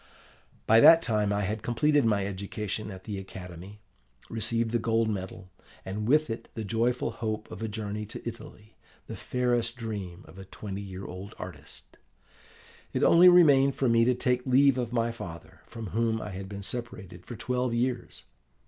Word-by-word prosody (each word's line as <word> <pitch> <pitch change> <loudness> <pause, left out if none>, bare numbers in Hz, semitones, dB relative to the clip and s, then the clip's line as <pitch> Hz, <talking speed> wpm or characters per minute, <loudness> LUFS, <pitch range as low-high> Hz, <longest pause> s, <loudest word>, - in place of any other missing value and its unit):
"By 110 +1 +6
that 165 +7 +8
time 105 -2 +1
I 100 0 0
had 105 +2 -2
completed 145 +5 +2
my 105 -3 +2
education 100 +2 -4
at 95 -2 -9
the 105 -3 -5
academy, 95 +1 -10 0.5
received 115 +1 -1
the 120 - +1
gold 115 0 +1
medal, 95 -2 -5 0.3
and 105 +3 -4
with 150 0 +3
it 115 - -6
the 110 - -4
joyful 115 +4 0
hope 110 -1 -4
of 105 - -8
a 110 - -2
journey 105 -1 -5
to 110 - -8
Italy 110 -2 -10 0.3
the - - -7
fairest 120 -2 -1
dream 105 -6 -6
of 95 - -13
a 95 - -9
twenty 100 +1 -7
year 95 -1 -8
old 95 +3 -8
artist. - - -10 1.0
It - - 0
only 175 +2 +8
remained 140 -6 +6
for 135 - +1
me 115 0 +4
to 125 0 +3
take 125 0 +1
leave 135 0 +4
of 120 -2 -3
my 115 -1 0
father, 85 -8 -10
from 115 -1 -7
whom 115 0 0
I 105 - -6
had 95 0 -7
been 100 -1 -7
separated 95 -6 -7
for 120 - -6
twelve 125 +1 -1
years. 120 +1 -2
110 Hz, 175 wpm, -28 LUFS, 100-120 Hz, 1.0 s, that